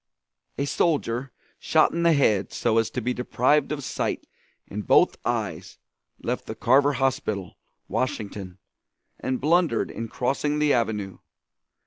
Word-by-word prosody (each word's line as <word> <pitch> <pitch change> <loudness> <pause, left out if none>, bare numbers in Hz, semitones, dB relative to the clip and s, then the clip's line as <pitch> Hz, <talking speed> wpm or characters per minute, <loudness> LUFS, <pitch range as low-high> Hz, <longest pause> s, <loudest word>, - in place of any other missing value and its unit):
A 140 - 0
soldier 135 -5 0 0.3
shot 160 -1 +3
in 170 - -2
the 170 -1 +5
head 110 -9 +2
so 115 -1 +1
as 115 - 0
to 125 - -4
be 125 +2 -1
deprived 130 +4 +1
of 145 -2 -3
sight - - -2 0.4
in 105 - -5
both - - +4
eyes - - -3 0.5
left - - -3
the - - -5
Carver 140 +4 +4
Hospital, 115 -7 -1 0.3
Washington, 100 -6 -3 0.6
and 130 0 -2
blundered 160 -4 +2
in 115 +2 -5
crossing 140 +6 -1
the 150 -1 +3
avenue. 105 -5 -1
125 Hz, 135 wpm, -25 LUFS, 110-145 Hz, 0.6 s, the